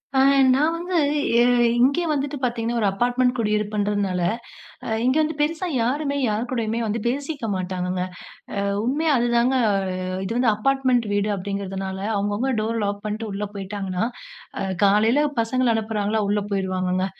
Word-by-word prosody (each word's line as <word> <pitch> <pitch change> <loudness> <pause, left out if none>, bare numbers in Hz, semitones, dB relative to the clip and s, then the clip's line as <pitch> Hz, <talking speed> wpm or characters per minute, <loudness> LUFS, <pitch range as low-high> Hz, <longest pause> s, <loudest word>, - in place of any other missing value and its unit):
அ 265 - +4 0.3
நான் 305 +5 +2
வந்து 350 +1 -2 0.4
ஏ - - +5 0.4
இங்கே 280 +7 +3
வந்துட்டு 285 0 -1
பார்த்தீங்கன்னா, 235 -1 -1
ஒரு 205 - +3
அப்பார்ட்மெண்ட் 245 +5 +1
குடியிருப்புன்றதுனால, 205 -3 0 0.6
அ - - -5 0.2
இங்கே 260 +4 +3
வந்து 310 0 -1
பெருசா 320 +4 0 0.2
யாருமே 280 +3 -1
யார் 220 +3 -1
கூடயுமே 230 -2 -1
வந்து 220 +2 -1
பேசிக்க 280 0 -2
மாட்டாங்கங்கங்க. 180 0 -2 0.5
அ 200 - -1 0.2
உண்மையா 300 +5 +1
அதுதாங்க 240 +2 +2 0.2
அ - - +1 0.5
இது 210 - -3
வந்து 245 -2 +4
அப்பார்ட்மெண்ட் 255 +1 +1
வீடு 205 +1 +1
அப்படிங்கிறதுனால, 195 0 -4 0.2
அவங்கவங்க 205 +6 0
டோர் 230 +1 -1
லாக் 205 0 -3
பண்ட்டு 215 +1 -3
உள்ளே 205 +1 -3
போயிட்டாங்கன்னா, 195 0 -3 0.5
அ - - -1 0.2
காலைல 220 +9 +4 0.2
பசங்கள 240 +1 +1
அனுப்புகிறாங்களா, 215 -1 -1
உள்ளே 205 -1 0
போயிருவாங்கங்க. 185 -1 0
225 Hz, 145 wpm, -23 LUFS, 200-260 Hz, 0.6 s, ஏ